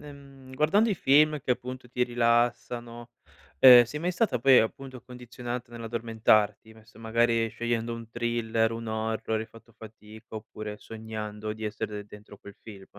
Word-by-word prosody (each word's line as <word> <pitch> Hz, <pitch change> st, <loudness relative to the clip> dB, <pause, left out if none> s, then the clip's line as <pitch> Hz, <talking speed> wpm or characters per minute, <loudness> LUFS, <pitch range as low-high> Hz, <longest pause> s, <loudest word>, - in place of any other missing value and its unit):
ehm, 140 Hz, -2 st, -14 dB
guardando 200 Hz, +11 st, +3 dB
i 205 Hz, -, +1 dB
film 150 Hz, 0 st, +3 dB
che 130 Hz, -, -5 dB
appunto 125 Hz, 0 st, -4 dB
ti 125 Hz, +1 st, 0 dB
rilassano, 120 Hz, 0 st, -1 dB, 0.5 s
ehm, 125 Hz, -2 st, +10 dB
sei 120 Hz, +6 st, -6 dB
mai 180 Hz, +3 st, -2 dB
stata 185 Hz, -, 0 dB
poi 130 Hz, +2 st, +6 dB
appunto 130 Hz, +3 st, -5 dB
condizionata 125 Hz, 0 st, -8 dB
nell'addormentarti, 110 Hz, -2 st, 0 dB
non 110 Hz, -1 st, -19 dB
so, 115 Hz, 0 st, -18 dB
magari 115 Hz, 0 st, +1 dB
scegliendo 115 Hz, +1 st, -3 dB
un 115 Hz, -1 st, -8 dB
thriller, 115 Hz, -1 st, -1 dB
un 115 Hz, 0 st, -6 dB
horror 110 Hz, 0 st, -2 dB
hai 110 Hz, -, -6 dB
fatto 115 Hz, 0 st, -18 dB
fatica, 110 Hz, 0 st, -12 dB
oppure 110 Hz, -1 st, -8 dB
sognando 110 Hz, -1 st, -7 dB
di 110 Hz, 0 st, -8 dB
essere 110 Hz, 0 st, -4 dB
de 105 Hz, -, -7 dB
dentro 105 Hz, 0 st, -14 dB
quel 100 Hz, -, -13 dB
film? 100 Hz, -3 st, -11 dB
115 Hz, 160 wpm, -27 LUFS, 110-125 Hz, 0.5 s, ehm